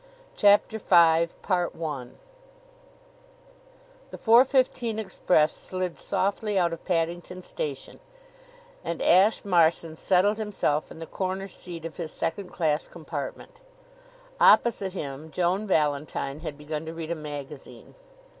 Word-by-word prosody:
CHAPTER 205 Hz, +2 st, +4 dB
V 170 Hz, -4 st, +5 dB, 0.2 s
The 160 Hz, -8 st, -2 dB, 2.1 s
four 235 Hz, +2 st, +6 dB
fifteen 255 Hz, -4 st, 0 dB
express 180 Hz, -6 st, +1 dB
slid 185 Hz, -2 st, -4 dB
softly 200 Hz, +2 st, -1 dB
out 170 Hz, -2 st, +2 dB
of 165 Hz, -, -8 dB
Paddington 175 Hz, +1 st, -2 dB
Station 140 Hz, -6 st, -6 dB, 0.8 s
and 170 Hz, -, -4 dB
Ashe 195 Hz, +5 st, +4 dB
Marson 165 Hz, -3 st, +2 dB
settled 195 Hz, +5 st, +2 dB
himself 195 Hz, -8 st, -1 dB
in -, -, -11 dB
the 165 Hz, -, -7 dB
corner 190 Hz, +2 st, -3 dB
seat 170 Hz, -3 st, -9 dB
of 165 Hz, -, -7 dB
his 165 Hz, -3 st, -5 dB
second 180 Hz, +3 st, -3 dB
class 155 Hz, -3 st, -1 dB
compartment. 155 Hz, -5 st, -7 dB, 0.8 s
Opposite 200 Hz, -5 st, +4 dB
him 145 Hz, -3 st, -6 dB
Joan 185 Hz, +5 st, 0 dB
Valentine 150 Hz, -3 st, -1 dB
had 155 Hz, -3 st, -6 dB
begun 150 Hz, +1 st, -5 dB
to 165 Hz, -, -6 dB
read 165 Hz, 0 st, -5 dB
a -, -, 0 dB
magazine. 145 Hz, -2 st, -9 dB
170 Hz, 115 wpm, -26 LUFS, 155-195 Hz, 2.1 s, four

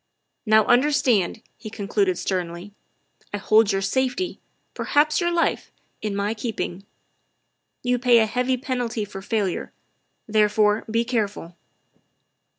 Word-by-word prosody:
" -, -, -53 dB
Now 215 Hz, 0 st, +5 dB
understand," 245 Hz, -6 st, +2 dB, 0.2 s
he 220 Hz, 0 st, -8 dB
concluded 200 Hz, -3 st, -1 dB
sternly, 180 Hz, +1 st, -4 dB, 0.3 s
" -, -, -36 dB
I -, -, -1 dB
hold 215 Hz, +1 st, +4 dB
your 195 Hz, 0 st, -1 dB
safety, 260 Hz, -, -1 dB, 0.3 s
perhaps 300 Hz, +3 st, +2 dB
your 345 Hz, -, +1 dB
life, 340 Hz, -1 st, 0 dB, 0.3 s
in 210 Hz, -2 st, -3 dB
my 200 Hz, +2 st, -1 dB
keeping. 210 Hz, -4 st, -5 dB, 1.0 s
You 245 Hz, 0 st, +1 dB
pay 245 Hz, -1 st, +5 dB
a 225 Hz, -, +5 dB
heavy 250 Hz, +3 st, 0 dB
penalty 245 Hz, -5 st, -3 dB
for 195 Hz, -1 st, -9 dB
failure, 200 Hz, -3 st, -2 dB, 0.5 s
therefore 210 Hz, 0 st, +2 dB
be 230 Hz, +1 st, +1 dB
careful. 205 Hz, -7 st, -3 dB
220 Hz, 130 wpm, -23 LUFS, 200-250 Hz, 1.0 s, Now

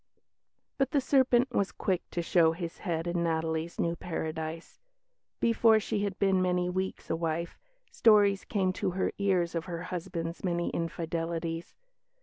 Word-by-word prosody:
But 270 Hz, -1 st, +2 dB
the 285 Hz, -, +2 dB
serpent 260 Hz, -2 st, +3 dB
was 200 Hz, -5 st, 0 dB
quick 185 Hz, -2 st, -1 dB
to 170 Hz, -, -2 dB
show 165 Hz, -1 st, +4 dB
his 170 Hz, 0 st, -6 dB
head 165 Hz, -4 st, -2 dB
in 175 Hz, 0 st, -1 dB
Natalie's 160 Hz, 0 st, -1 dB
new 170 Hz, 0 st, +1 dB
paradise. 160 Hz, -1 st, -5 dB, 0.6 s
Before 230 Hz, -1 st, +4 dB
she 210 Hz, -1 st, -2 dB
had 200 Hz, -2 st, -2 dB
been 195 Hz, -2 st, +3 dB
many 180 Hz, 0 st, +1 dB
weeks 190 Hz, +1 st, -3 dB
a -, -, +2 dB
wife, 165 Hz, +1 st, -3 dB, 0.3 s
stories 205 Hz, -3 st, +5 dB
came 190 Hz, -3 st, 0 dB
to -, -, -1 dB
her -, -, +1 dB
ears 185 Hz, -4 st, +1 dB
of 165 Hz, -1 st, -2 dB
her 170 Hz, -2 st, -5 dB
husband's 170 Hz, -1 st, -5 dB
many 175 Hz, -2 st, 0 dB
infidelities. 165 Hz, 0 st, -3 dB
175 Hz, 150 wpm, -30 LUFS, 165-195 Hz, 0.6 s, stories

